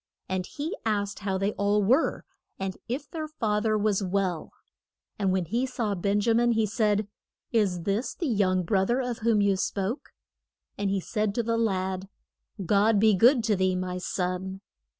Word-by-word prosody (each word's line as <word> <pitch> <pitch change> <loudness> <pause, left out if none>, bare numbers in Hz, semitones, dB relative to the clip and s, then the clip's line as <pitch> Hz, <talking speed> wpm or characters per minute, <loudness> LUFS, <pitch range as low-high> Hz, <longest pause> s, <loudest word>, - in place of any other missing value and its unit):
And 185 -1 -2
he 300 +4 -4
asked 205 -2 -1
how 195 -2 -1
they 195 +2 0
all 205 0 +1
were, 255 +11 +2 0.3
and 190 -1 -3
if 275 +5 -3
their 315 -2 -5
fath 215 -8 -1
er 215 0 +2
was 210 -1 +1
well; 185 -3 -1 0.7
and 195 -2 +2
when 185 -1 0
he 235 +9 -1
saw 235 -5 -2
Ben 200 +2 0
ja 230 +2 +2
min 240 +1 +3
he 225 -1 +2
said, 210 -1 +1 0.4
Is 200 -6 +1
this 200 +7 -1
the 345 - -3
young 195 - +2
broth 190 +3 +1
er 240 +2 +2
of 245 -3 -3
whom 220 -2 +2
you 200 -1 +3
spoke? 195 +5 -2 0.7
And 200 -1 -1
he 195 -1 0
said 210 +1 -1
to 235 - +1
the 230 +1 0
lad, 190 -4 -1 0.6
God 205 +3 +3
be 215 0 +5
good 235 +5 +5
to 220 -2 +2
thee, 185 -1 +1
my 180 0 -3
son. 185 +1 -3
205 Hz, 185 wpm, -27 LUFS, 190-225 Hz, 0.7 s, be